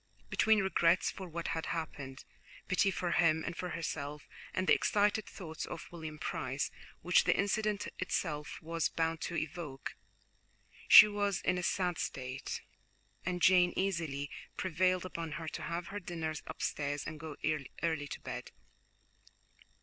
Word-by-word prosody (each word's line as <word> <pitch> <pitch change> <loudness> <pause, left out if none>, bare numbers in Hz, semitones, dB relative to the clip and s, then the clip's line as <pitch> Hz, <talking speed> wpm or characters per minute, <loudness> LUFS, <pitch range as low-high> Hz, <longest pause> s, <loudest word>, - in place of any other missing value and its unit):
Between 220 -1 +4
regrets 180 -2 +3
for 190 -2 -8
what 170 +1 -3
had 160 -1 -2
happened, 145 -5 -5 0.4
pity 185 +2 +3
for 180 -2 -1
him 160 -2 +3
and - - -3
for 180 - -4
herself, 150 -3 -4 0.2
and 185 - -1
the - - +6
excited 210 +1 +2
thoughts 160 -5 -6
of - - -7
William 160 -3 -7
Price 135 -2 -2 0.3
which 180 0 +5
the - - +4
incident 205 +1 +1
itself 150 -5 -2
was 165 0 0
bound 165 0 -1
to 170 - -3
evoke, 155 -4 -4 0.9
she - - +12
was 205 -2 0
in 185 0 +1
a - - -2
sad 180 -1 0
state, 130 0 -4 0.6
and 180 -1 -1
Jane 180 -1 +6
easily 165 -7 -1 0.3
prevailed 185 0 +1
upon 165 -4 -4
her 160 0 -5
to - - -6
have 170 +1 -3
her 205 - -4
dinner 165 -4 -3
upstairs 145 0 -2
and 155 - -6
go 155 -1 -6 0.5
early 160 -3 0
to - - -6
bed. - - -6
170 Hz, 150 wpm, -33 LUFS, 155-185 Hz, 0.9 s, she